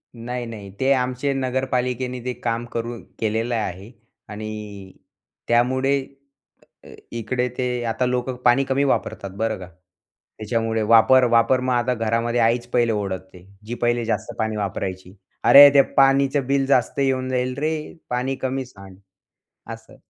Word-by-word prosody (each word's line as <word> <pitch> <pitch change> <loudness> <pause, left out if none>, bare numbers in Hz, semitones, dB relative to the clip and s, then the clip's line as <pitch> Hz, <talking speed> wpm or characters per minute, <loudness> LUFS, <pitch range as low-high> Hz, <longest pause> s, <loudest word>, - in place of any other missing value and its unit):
नाही, 120 +1 -5
नाही. 105 -4 -9
ते 135 +1 +2
आमचे 130 +2 -1
नगरपालिकेने 125 -1 -2
ते 125 - -2
काम 115 0 -1
करून 115 0 -4 0.2
केलेलं 115 +2 -1
आहे 100 0 -4 0.4
आणि 105 -2 -8 0.5
त्यामुळे 130 +4 +2 0.9
अ, - - -14 0.2
इकडे 125 +2 -2
ते 125 -1 -1
आता 115 +2 -1
लोकं 125 +1 -1
पाणी 125 +3 +4
कमी 135 +1 0
वापरतात 100 -7 -2
बरं 110 -1 -1
का. 90 -1 -10 0.7
त्याच्यामुळे 110 0 -1
वापर, 115 +4 +5
वापर 120 +2 +3
मग 130 0 -1
आता 120 +1 +1
घरामध्ये 115 +1 0
आईच 120 +1 +2
पहिले 120 -2 +2
ओरडते, 95 -3 -5 0.2
जी 120 - -4
पहिले 120 0 +1
जास्त 115 - -2
पाणी 110 -1 -1
वापरायची. 95 -2 -4 0.3
"अरे! 140 +4 +10
ते 140 - +8
पाणीचं 135 0 +3
बिल 135 0 +1
जास्त 130 -1 +1
येऊन 130 -1 0
जाईल 125 0 -1
रे. 155 +2 0 0.4
पाणी 125 +2 -1
कमी 130 0 -2
सांड." 100 -5 -14 0.8
असं. - - -16
120 Hz, 145 wpm, -22 LUFS, 110-130 Hz, 0.9 s, अरे